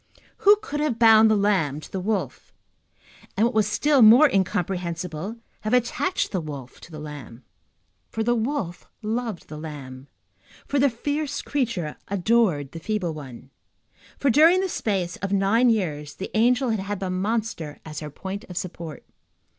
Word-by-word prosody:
Who 415 -1 +6
could 295 -8 -4
have 295 -6 0
bound 225 -1 +7
the 215 - +4
lamb 190 -9 +1
to - - -12
the 190 - -3
wolf, 190 - -3 0.9
and, 215 - +4
what 240 - 0
was 215 -2 +2
still 275 +6 +3
more 235 +7 +9
incomprehensible, 180 - -2 0.2
have 215 +3 0
attached 250 +9 0
the 185 - -1
wolf 140 -5 -8
to - - -13
the 155 - -8
lamb? 145 -5 -9 0.7
For 220 - -2
the 240 +2 +2
wolf 225 - -3 0.2
loved 225 -3 -3
the 155 - -8
lamb, 140 -4 -8 0.6
for 280 - 0
the 280 +1 +4
fierce 290 +5 -3
creature 235 - -2
adored 195 - +1
the 165 - -7
feeble 185 -2 -2
one, 135 -3 -10 0.7
for, 280 - +2
during 330 +8 +6
the 380 - -1
space 190 - -2
of 200 0 -4
nine 200 +5 +3
years, 150 -9 -1
the 190 - -7
angel 245 +3 +3
had 220 - 0
had 200 0 -4
the 190 -1 -3
monster 200 -5 -2
as 155 -2 -6
her 150 - -6
point 190 +7 -6
of 180 - -9
support. 165 -4 -6
200 Hz, 165 wpm, -24 LUFS, 160-235 Hz, 0.9 s, more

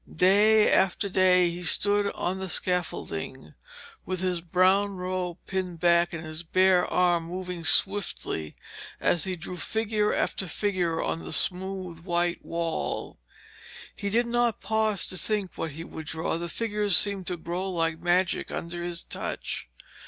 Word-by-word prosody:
Day 210 +5 +5
after 195 +2 +2
day 185 -1 +4
he 175 +1 -6
stood 205 +4 +2
on 185 +2 -2
the 190 -1 -4
scaffolding, 180 +1 -3 0.5
with 185 -1 -2
his 180 -2 -1
brown 185 +4 +2
robe 180 -1 -3
pinned 185 -3 -3
back 170 0 +3
and 165 -1 -6
his 155 +1 -6
bare 185 +1 +3
arm 175 -2 +2
moving 180 0 -5
swiftly 185 - +1 0.4
as 175 - +1
he 185 -1 -2
drew 180 +2 -7
figure 215 +3 0
after 190 - -1
figure 175 -3 -1
on 165 - -3
the - - -7
smooth 185 -2 -1
white 175 0 -1
wall. 165 -1 -3 0.8
He 200 - -3
did 235 +4 +2
not 240 -1 +1
pause 220 -2 +1
to 185 - -1
think 205 -1 -1
what 160 -3 -4
he 165 +3 -7
would 160 -2 -9
draw, 160 +1 -2
the 170 0 -4
figures 210 -2 +1
seemed 195 -1 +3
to 180 - -1
grow 175 +3 -4
like 165 -3 -1
magic 175 +1 +1
under 170 +1 -5
his 175 -1 -3
touch. - - -5
180 Hz, 150 wpm, -27 LUFS, 170-195 Hz, 0.8 s, Day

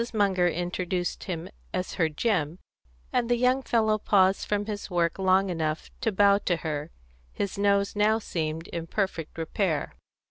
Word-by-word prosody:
Munger 190 -4 +3
introduced 175 +1 -2
him 175 -2 -4 0.3
as 185 0 -2
her 165 -3 +1
Jim, 160 -2 0 0.6
and 245 -1 +1
the 240 - +3
young 255 +2 +3
fellow 220 -4 +2
paused 190 -2 +3
from 205 0 0
his 210 -1 -5
work 175 0 0
long 190 0 +3
enough 160 -2 -2
to 225 - +1
bow 200 0 +5
to 180 - 0
her: 150 0 -2 0.4
his 200 - -3
nose 200 0 +2
now 210 +1 +3
seemed 165 -5 -3
in 165 -1 -5
perfect 180 -5 -2
repair. 165 -1 -1
190 Hz, 155 wpm, -27 LUFS, 170-205 Hz, 0.6 s, bow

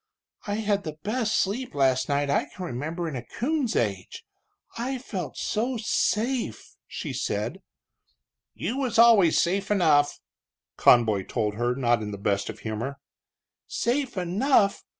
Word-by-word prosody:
"I 205 - -1
had 205 -2 0
the 155 -2 -6
best 220 +1 0
sleep 215 - -1
last 130 -1 +2
night 145 0 +1
I 140 - +1
can 185 - -8
remember 165 +5 -4
in 155 - -5
a 125 - -3
coon's 265 - -2
age 100 -5 -2 0.5
I 255 +3 -2
felt 195 - -6
so 240 +4 -1
safe," 230 +3 -1
she - - -5
said. - - -3 0.9
"You 250 - -3
always 245 -3 -1
was 225 -8 +6
safe 195 +3 0
enough," 155 -8 +3 0.6
Conboy 110 -6 +4
told 105 -4 -1
her, 120 +3 -1
not 120 -3 +2
in 105 - -4
the 100 - -5
best 100 +1 -1
of 110 - -8
humor. 115 +6 -4 0.7
"Safe 255 -1 -1
enough! 200 +4 +2
175 Hz, 145 wpm, -26 LUFS, -, 0.9 s, was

